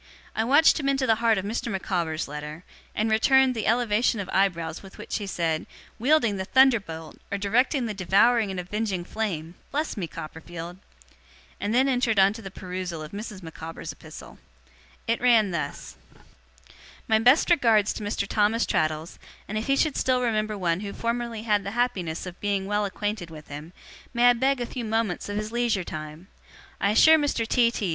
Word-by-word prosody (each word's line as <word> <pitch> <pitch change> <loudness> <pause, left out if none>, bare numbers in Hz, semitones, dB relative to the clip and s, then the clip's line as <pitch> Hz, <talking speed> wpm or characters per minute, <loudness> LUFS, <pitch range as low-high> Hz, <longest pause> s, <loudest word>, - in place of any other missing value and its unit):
I 220 - +1
watched 290 +8 +5
him 275 -2 0
into 270 -1 +1
the 225 - +4
heart 225 -2 +3
of 190 - -2
Mr. 230 +2 -3
Micawber's 175 -5 -2
letter, 150 +3 -7 0.3
and 220 +1 0
returned 265 +4 +4
the 225 -3 -3
elevation 230 0 +2
of 190 -2 -5
eyebrows 170 -4 0
with 195 -1 -13
which - - -4
he 205 - -5
said 165 -4 -1 0.3
"'Wielding 240 -5 +3
the 190 - -3
thunderbolt, 205 -11 +2
or 200 - 0
directing 245 +6 +1
the 220 - -3
devouring 205 +4 +3
and 190 -1 -4
avenging 190 0 -2
flame!" 175 -5 -4 0.2
Bless 300 +3 -2
me, 190 -6 -3
Copperfield!' 165 +3 -8 0.8
and 210 +3 -1
then 260 +2 +4
entered 245 -4 +1
on 195 0 +6
the 215 -2 -8
perusal 180 -3 -5
of 155 - -9
Mrs. 205 -2 -7
Micawber's 165 0 -7
epistle. - - -12 0.7
It 230 +1 0
ran 230 -5 +4
thus: 170 - -5 1.1
'My 220 0 +4
best 250 +10 +4
regards 225 -10 +4
to 215 - -6
Mr. 205 -1 -2
Thomas 215 +3 +2
Traddles, 155 +1 -1 0.3
and 215 - -5
if 215 +1 -2
he 275 - +3
should 300 0 +1
still 255 -1 +1
remember 215 -2 0
one 175 -2 0
who 200 0 -6
formerly 235 -1 -3
had 210 -3 +1
the 200 +4 -6
happiness 190 -11 -1
of 180 -1 -9
being 200 -2 0
well 205 +1 0
acquainted 205 -2 -3
with 155 -2 -12
him, 150 +3 -8 0.4
may 245 +1 +6
I - - +3
beg 265 +2 +1
a 240 - -2
few 240 +1 -6
moments 220 -4 -1
of 205 - -3
his 215 +1 -3
leisure 235 -5 0
time? 155 +2 -8 0.5
I 200 - +2
assure 315 +9 +6
Mr. 280 -6 0
T. 235 0 +4
T. 210 -5 -3
210 Hz, 185 wpm, -26 LUFS, 180-235 Hz, 1.1 s, on